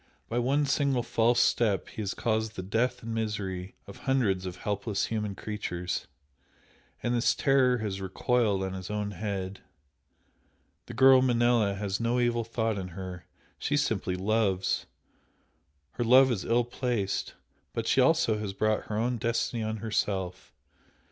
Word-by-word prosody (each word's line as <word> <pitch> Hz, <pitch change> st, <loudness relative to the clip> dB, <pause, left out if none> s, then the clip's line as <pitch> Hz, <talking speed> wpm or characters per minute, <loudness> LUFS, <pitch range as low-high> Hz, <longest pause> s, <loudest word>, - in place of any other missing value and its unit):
By 120 Hz, -, -1 dB
one 140 Hz, +4 st, +2 dB
single 135 Hz, -2 st, +1 dB
false 120 Hz, +1 st, +2 dB
step 110 Hz, -4 st, +2 dB
he -, -, -6 dB
has 100 Hz, -2 st, -3 dB
caused 110 Hz, -1 st, -1 dB
the 95 Hz, -, -5 dB
death 125 Hz, +5 st, 0 dB
and 115 Hz, 0 st, -4 dB
misery 100 Hz, -4 st, -3 dB
of 100 Hz, -, -11 dB
hundreds 105 Hz, -9 st, 0 dB
of 90 Hz, -, -5 dB
helpless 100 Hz, 0 st, -2 dB
human 105 Hz, -3 st, -3 dB
creatures 90 Hz, -5 st, -4 dB, 1.0 s
and 120 Hz, -, 0 dB
this 120 Hz, 0 st, +2 dB
terror 130 Hz, -3 st, +3 dB
has 100 Hz, -4 st, -4 dB
recoiled 100 Hz, +1 st, +1 dB
on 95 Hz, 0 st, -3 dB
his 95 Hz, -1 st, -6 dB
own 105 Hz, -1 st, -2 dB
head. 100 Hz, -1 st, -4 dB, 1.3 s
The -, -, -8 dB
girl 130 Hz, -1 st, +7 dB
Manella 120 Hz, -5 st, +3 dB
has 100 Hz, -1 st, -2 dB
no 120 Hz, +1 st, +1 dB
evil 120 Hz, -1 st, +1 dB
thought 110 Hz, -2 st, -1 dB
in 95 Hz, -, -5 dB
her 90 Hz, -2 st, -7 dB, 0.3 s
she -, -, 0 dB
simply 90 Hz, -, 0 dB
loves! 95 Hz, -1 st, 0 dB, 1.0 s
her 120 Hz, -, -2 dB
love 130 Hz, +3 st, +6 dB
is 100 Hz, -6 st, -2 dB
ill 120 Hz, +1 st, +3 dB
placed, 120 Hz, -4 st, -2 dB, 0.4 s
but -, -, -3 dB
she -, -, +3 dB
also 110 Hz, -2 st, +3 dB
has 105 Hz, -2 st, -4 dB
brought 110 Hz, +1 st, 0 dB
her 105 Hz, -, -3 dB
own 120 Hz, +2 st, 0 dB
destiny 115 Hz, +1 st, -1 dB
on 110 Hz, 0 st, -2 dB
herself. 95 Hz, -4 st, -2 dB
110 Hz, 155 wpm, -28 LUFS, 95-120 Hz, 1.3 s, girl